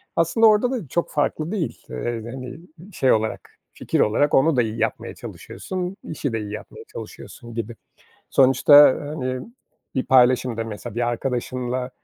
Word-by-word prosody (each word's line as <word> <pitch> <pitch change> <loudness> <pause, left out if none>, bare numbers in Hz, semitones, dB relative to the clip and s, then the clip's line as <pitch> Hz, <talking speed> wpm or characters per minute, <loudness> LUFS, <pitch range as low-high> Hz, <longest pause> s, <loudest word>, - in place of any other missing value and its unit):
Aslında 170 +7 +4
orada 215 +4 +4
da 225 - -4
çok 170 +6 -2
farklı 155 +2 -1
değil. 195 -7 -4
Eee, 115 -2 -4
hani, 130 +2 -8 0.3
şey 130 - +2
olarak, 110 0 -1 0.3
fikir - - -2
olarak 145 +7 +2
onu 150 +2 +4
da 125 - +4
iyi 110 0 -3
yapmaya 115 0 -2
çalışıyorsun, 185 0 -6
işi 140 -5 -4
de 115 - -1
iyi 105 -1 -6
yapmaya 105 - -9
çalışıyorsun 120 0 -10
gibi. 115 0 -5 0.6
Sonuçta, 135 +2 +5 0.3
hani, 130 -4 -4 0.5
bir 130 - 0
paylaşım 125 -2 +4
da, 115 - -2
mesela, 110 0 -7
bir 120 0 0
arkadaşınla 125 +1 -3
130 Hz, 155 wpm, -22 LUFS, 120-155 Hz, 0.6 s, Sonuçta